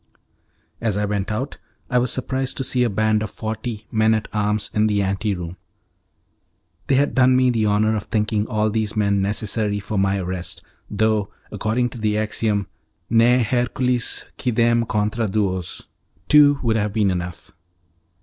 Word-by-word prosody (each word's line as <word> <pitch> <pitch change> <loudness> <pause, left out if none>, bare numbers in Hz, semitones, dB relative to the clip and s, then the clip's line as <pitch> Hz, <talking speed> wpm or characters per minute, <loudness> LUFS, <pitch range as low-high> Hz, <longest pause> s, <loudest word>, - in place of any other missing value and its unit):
As 110 -3 0
I 105 - +1
went 100 0 -2
out 120 +6 -4 0.3
I 125 - +2
was 125 -1 0
surprised 130 0 -2
to 135 - -1
see 125 -1 +1
a 120 - +2
band 110 +1 +1
of 110 - -3
forty 110 0 -5
men 110 0 +3
at 110 - -3
arms 105 0 0
in 105 0 +3
the 100 -1 +1
ante 100 +2 -1
room. 90 0 -7 1.3
They 135 - +3
had 140 +2 +2
done 130 0 +4
me 130 0 +4
the 110 -3 +1
honour 105 +2 +2
of 105 - -3
thinking 105 -1 0
all 110 -2 0
these 110 -1 -1
men 100 -2 +2
necessary 105 +1 -1
for 105 0 -3
my 100 0 +2
arrest, 90 -1 -4 0.3
though, 105 -1 +1 0.2
according 110 +4 0
to 120 - -10
the 105 -1 0
axiom 110 -1 -1 0.5
'Ne 120 +2 +5
Hercules 125 +1 0
quidem 115 -1 +2
contra 105 +2 0
duos', 95 -3 -2 0.4
two 145 -1 +6
would 115 -2 +2
have 105 -1 -1
been 105 -3 +2
enough. 90 -1 -5
110 Hz, 165 wpm, -22 LUFS, 105-115 Hz, 1.3 s, two